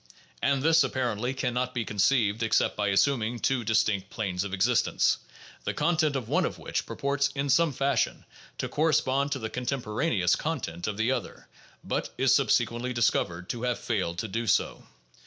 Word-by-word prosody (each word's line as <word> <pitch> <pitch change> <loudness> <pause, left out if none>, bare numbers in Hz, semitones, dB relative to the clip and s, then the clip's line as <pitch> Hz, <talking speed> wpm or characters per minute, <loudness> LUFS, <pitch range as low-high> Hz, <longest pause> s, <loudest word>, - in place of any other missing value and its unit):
And 140 -1 +1
this 160 -1 +5
apparently 125 -2 -1
can 125 -2 -1
not 125 +1 -2
be 120 -2 -1
conceived 105 +1 +2
except 115 - +2
by 105 -1 0
assuming 115 +3 +2
two 125 +1 0
distinct 105 -3 +1
planes 95 -4 -2
of 100 - -5
existence, 105 +4 +2 0.4
the - - -3
content 155 -4 +1
of 125 -5 -3
one - - +2
of - - -2
which - - -3
purports 140 0 0
in 140 0 -1
some 165 +4 +4
fashion 135 -2 0 0.3
to - - -2
correspond 140 -3 +1
to - - -2
the 110 -3 -5
contem 125 +1 -2
poraneous 105 - +1
content 115 - -4
of 105 -1 -3
the 110 +3 +1
other, - - -4 0.4
but - - -2
is - - +3
subsequently 120 +2 +1
discovered 90 -6 0
to 120 - -3
have 125 -1 0
failed 95 -7 -2
to 110 - -3
do 115 +3 -3
so. - - 0
120 Hz, 175 wpm, -27 LUFS, 105-135 Hz, 0.4 s, this